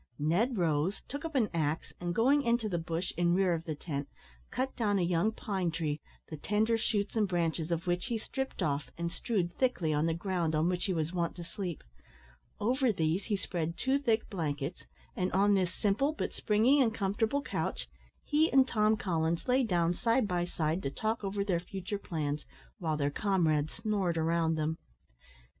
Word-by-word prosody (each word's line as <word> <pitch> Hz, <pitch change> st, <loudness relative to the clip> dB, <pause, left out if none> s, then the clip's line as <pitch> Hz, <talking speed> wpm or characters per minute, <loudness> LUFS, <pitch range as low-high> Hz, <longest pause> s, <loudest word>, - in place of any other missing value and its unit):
Ned 195 Hz, -, +1 dB
rose, 165 Hz, +2 st, +1 dB
took 285 Hz, +4 st, -5 dB
up 320 Hz, -2 st, -5 dB
an 240 Hz, -5 st, +3 dB
axe, 155 Hz, -1 st, -1 dB
and, 175 Hz, 0 st, -2 dB
going 270 Hz, +6 st, +4 dB
into 235 Hz, -3 st, +1 dB
the 175 Hz, -4 st, -1 dB
bush 165 Hz, +2 st, -3 dB
in 175 Hz, 0 st, +3 dB
rear 185 Hz, -2 st, +3 dB
of 165 Hz, 0 st, -3 dB
the 155 Hz, -3 st, -3 dB
tent, 145 Hz, -2 st, -4 dB, 0.4 s
cut 260 Hz, +1 st, -2 dB
down 210 Hz, -4 st, +1 dB
a 185 Hz, -, +2 dB
young 175 Hz, +5 st, +2 dB
pine 195 Hz, -5 st, -2 dB
tree, 155 Hz, -2 st, -2 dB, 0.3 s
the 155 Hz, -, -7 dB
tender 215 Hz, +8 st, +1 dB
shoots 215 Hz, -2 st, -1 dB
and 215 Hz, -2 st, +3 dB
branches 165 Hz, -2 st, 0 dB
of 170 Hz, 0 st, -1 dB
which 175 Hz, +2 st, 0 dB
he 235 Hz, -3 st, 0 dB
stripped 265 Hz, +4 st, -4 dB
off, 145 Hz, -1 st, -1 dB
and 170 Hz, 0 st, -2 dB
strewed 185 Hz, -7 st, -1 dB
thickly 190 Hz, -12 st, +1 dB
on 150 Hz, +2 st, +2 dB
the 165 Hz, -, +1 dB
ground 170 Hz, -3 st, -1 dB
on 155 Hz, +2 st, +2 dB
which 180 Hz, -1 st, 0 dB
he 195 Hz, -, 0 dB
was 160 Hz, +1 st, -1 dB
wont 170 Hz, -2 st, -1 dB
to 175 Hz, -, -7 dB
sleep; 175 Hz, -1 st, -5 dB, 0.8 s
over 250 Hz, +4 st, +2 dB
these 165 Hz, 0 st, 0 dB
he 215 Hz, -, 0 dB
spread 170 Hz, -3 st, -3 dB
two 265 Hz, +1 st, +2 dB
thick 230 Hz, -5 st, +1 dB
blankets, 155 Hz, -4 st, -3 dB, 0.3 s
and 185 Hz, 0 st, 0 dB
on 200 Hz, +2 st, +4 dB
this 185 Hz, -3 st, +2 dB
simple 215 Hz, +11 st, +1 dB
but -, -, -3 dB
springy 230 Hz, +7 st, +3 dB
and 225 Hz, -3 st, +2 dB
comfortable 220 Hz, +7 st, 0 dB
couch -, -, -3 dB, 0.4 s
he 310 Hz, +2 st, +2 dB
and 265 Hz, -1 st, +6 dB
Tom 215 Hz, -2 st, +3 dB
Coffins 165 Hz, -2 st, -1 dB
lay 255 Hz, +1 st, +4 dB
down 175 Hz, -7 st, +2 dB
side 230 Hz, +3 st, +2 dB
by 175 Hz, -2 st, 0 dB
side 165 Hz, 0 st, -1 dB
to 135 Hz, -, -2 dB
talk 215 Hz, +10 st, -2 dB
over 200 Hz, 0 st, -1 dB
their 180 Hz, -4 st, +1 dB
future 190 Hz, +3 st, -5 dB
plans, 150 Hz, -6 st, -3 dB, 0.4 s
while 160 Hz, -3 st, -1 dB
their 145 Hz, -1 st, 0 dB
comrades 160 Hz, -5 st, +1 dB
snored 195 Hz, -6 st, -1 dB
around 165 Hz, 0 st, +2 dB
them. 155 Hz, +1 st, -1 dB
180 Hz, 190 wpm, -31 LUFS, 165-220 Hz, 0.8 s, and